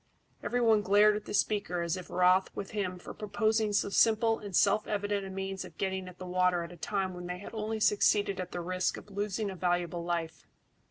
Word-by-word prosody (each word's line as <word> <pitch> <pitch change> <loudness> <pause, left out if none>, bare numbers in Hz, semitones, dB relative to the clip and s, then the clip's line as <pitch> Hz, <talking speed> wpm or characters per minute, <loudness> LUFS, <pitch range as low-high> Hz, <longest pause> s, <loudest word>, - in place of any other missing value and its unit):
Every 245 - -1
one 220 -3 +4
glared 205 +1 +5
at 210 - -5
the - - -6
speaker 195 -5 0
as 170 +1 -1
if 185 -1 -8
wroth 180 +1 +3
with 200 - -5
him 190 -4 -2
for 180 - -9
proposing 215 +1 0
so 205 - +1
simple 225 +2 +3
and 200 -3 -6
self 210 +3 +3
evident 205 -1 -1
a - - -7
means 190 0 -4
of - - -12
getting 190 -1 -2
at 180 -1 -11
the 185 - -8
water 180 -1 +1
at 170 - -8
a - - -10
time 190 +3 -2
when 180 0 -7
they 180 0 -4
had 200 - -10
only 220 0 -3
succeeded 205 -2 +3
at 185 - -5
the 175 - -4
risk 185 +1 -1
of 210 - -12
losing 205 +1 -2
a - - -7
valuable 175 -1 -1
life. 170 -2 -3
195 Hz, 225 wpm, -30 LUFS, 180-210 Hz, -, glared